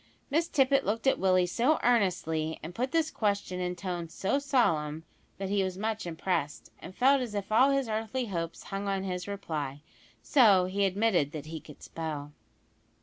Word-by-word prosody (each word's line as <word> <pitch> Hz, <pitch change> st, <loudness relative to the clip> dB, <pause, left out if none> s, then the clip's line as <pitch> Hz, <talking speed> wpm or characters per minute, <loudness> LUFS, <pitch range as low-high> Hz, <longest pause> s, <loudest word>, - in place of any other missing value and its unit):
Miss 325 Hz, +3 st, +2 dB
Tippet 275 Hz, -2 st, +3 dB
looked 225 Hz, +4 st, -2 dB
at 270 Hz, -, +3 dB
Willie 185 Hz, -1 st, +3 dB
so 245 Hz, -, +2 dB
earnestly 175 Hz, -9 st, +1 dB
and 165 Hz, +3 st, -6 dB
put 255 Hz, +6 st, -2 dB
this 325 Hz, -1 st, +1 dB
question 200 Hz, -3 st, -1 dB
in 180 Hz, 0 st, -2 dB
tones 175 Hz, -3 st, -5 dB
so 195 Hz, +9 st, 0 dB
solemn 160 Hz, -, +1 dB, 0.3 s
that 195 Hz, 0 st, -4 dB
he 200 Hz, 0 st, +2 dB
was 185 Hz, -1 st, -3 dB
much 215 Hz, -1 st, -2 dB
impressed, 165 Hz, -3 st, -2 dB
and 185 Hz, -, -10 dB
felt 270 Hz, +2 st, +4 dB
as 235 Hz, -4 st, -4 dB
if 200 Hz, 0 st, -4 dB
all 255 Hz, +5 st, +5 dB
his 275 Hz, -2 st, +1 dB
earthly 225 Hz, +3 st, -2 dB
hopes 170 Hz, -5 st, -4 dB
hung 195 Hz, 0 st, -4 dB
on 195 Hz, -1 st, -1 dB
his 180 Hz, -1 st, -4 dB
reply, 150 Hz, -8 st, -4 dB, 0.4 s
so 210 Hz, -10 st, +5 dB
he 200 Hz, +2 st, 0 dB
admitted 190 Hz, -6 st, +1 dB
that 150 Hz, -2 st, -6 dB
he 160 Hz, +1 st, -6 dB
could 150 Hz, -, -14 dB
spell. 150 Hz, -3 st, -5 dB
195 Hz, 180 wpm, -29 LUFS, 170-230 Hz, 0.4 s, all